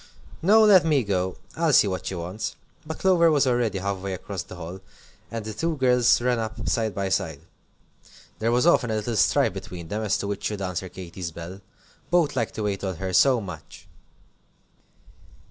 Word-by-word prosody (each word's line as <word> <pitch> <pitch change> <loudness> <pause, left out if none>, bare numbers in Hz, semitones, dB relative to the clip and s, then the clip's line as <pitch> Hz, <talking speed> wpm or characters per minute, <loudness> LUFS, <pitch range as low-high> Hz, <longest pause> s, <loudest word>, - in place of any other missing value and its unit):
"No, 215 +6 +6
let 200 -4 +7
me 150 -5 +2
go. 95 -3 -1 0.2
I'll 160 -2 +1
see 105 - +6
what 95 -3 -3
she 95 - -3
wants." 90 +5 -5 0.3
But 160 - -5
Clover 175 -3 +4
was 145 -3 +3
already 120 -5 +1
half 100 +1 -2
way 95 0 -4
across 95 0 -6
the 90 - -10
hall, 90 +2 -7 0.5
and 115 -2 -5
the 110 - -5
two 160 +8 -2
girls 125 -2 +4
ran 120 0 +1
up 110 -1 -5
side 110 -4 0
by 100 -1 -1
side. 80 -5 -1 1.0
There 115 +1 +1
was 125 +4 +2
often 135 -8 +4
a 110 - 0
little 110 +2 -2
strife - - +3
between 85 -3 -8
them 105 +4 -2
as 105 -3 +1
to 100 - -4
which 100 0 -4
should 105 -2 -2
answer 90 0 -3
Katy's 90 -1 -7
bell. 85 +4 -9 0.5
Both 170 -4 +2
liked 115 - -2
to 110 - -3
wait 100 -2 -2
on 95 -2 -2
her 95 +2 -4
so 130 +4 +5
much. 90 -7 -10
105 Hz, 195 wpm, -25 LUFS, 95-125 Hz, 1.0 s, let